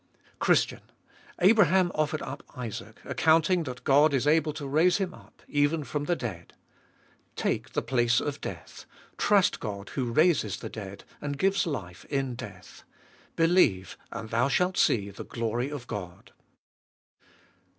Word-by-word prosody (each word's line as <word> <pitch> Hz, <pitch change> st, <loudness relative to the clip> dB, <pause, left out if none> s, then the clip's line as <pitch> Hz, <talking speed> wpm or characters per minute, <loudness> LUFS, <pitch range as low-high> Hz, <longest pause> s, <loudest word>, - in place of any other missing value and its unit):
Christian! -, -, +2 dB, 0.6 s
Abraham 190 Hz, -3 st, +5 dB
offered 155 Hz, 0 st, -1 dB
up 140 Hz, -, -6 dB, 0.2 s
Isaac, 120 Hz, -4 st, -6 dB
accounting 165 Hz, +3 st, +3 dB
that 125 Hz, -2 st, -7 dB
God 145 Hz, +2 st, +4 dB
is 130 Hz, -, 0 dB
able 155 Hz, +1 st, +3 dB
to 145 Hz, -1 st, -6 dB
raise 160 Hz, +6 st, +3 dB
him 190 Hz, -3 st, -2 dB
up, -, -, -18 dB
even 145 Hz, +2 st, +1 dB
from 145 Hz, +1 st, -3 dB
the 175 Hz, -, +1 dB
dead. 95 Hz, -, -6 dB, 0.8 s
Take -, -, -2 dB
the -, -, -1 dB
place 120 Hz, -2 st, +2 dB
of 145 Hz, 0 st, -4 dB
death; -, -, -8 dB, 0.3 s
trust 200 Hz, -3 st, +3 dB
God 100 Hz, -3 st, -6 dB
who 125 Hz, -4 st, -2 dB
raises 150 Hz, -, +3 dB
the -, -, -7 dB
dead, 100 Hz, -2 st, -8 dB, 0.2 s
and 145 Hz, -1 st, -3 dB
gives 195 Hz, +3 st, +2 dB
life 100 Hz, -, -5 dB
in 135 Hz, -3 st, -2 dB
death; 115 Hz, -, -10 dB, 0.5 s
believe 165 Hz, -, +3 dB, 0.2 s
and 110 Hz, -, -7 dB
thou 120 Hz, +3 st, +2 dB
shalt 180 Hz, +7 st, +1 dB
see 100 Hz, -3 st, +2 dB
the 100 Hz, -, -8 dB
glory 120 Hz, +3 st, -2 dB
of 145 Hz, -4 st, -6 dB
God. 95 Hz, -5 st, -7 dB
140 Hz, 145 wpm, -28 LUFS, 115-165 Hz, 0.8 s, Abraham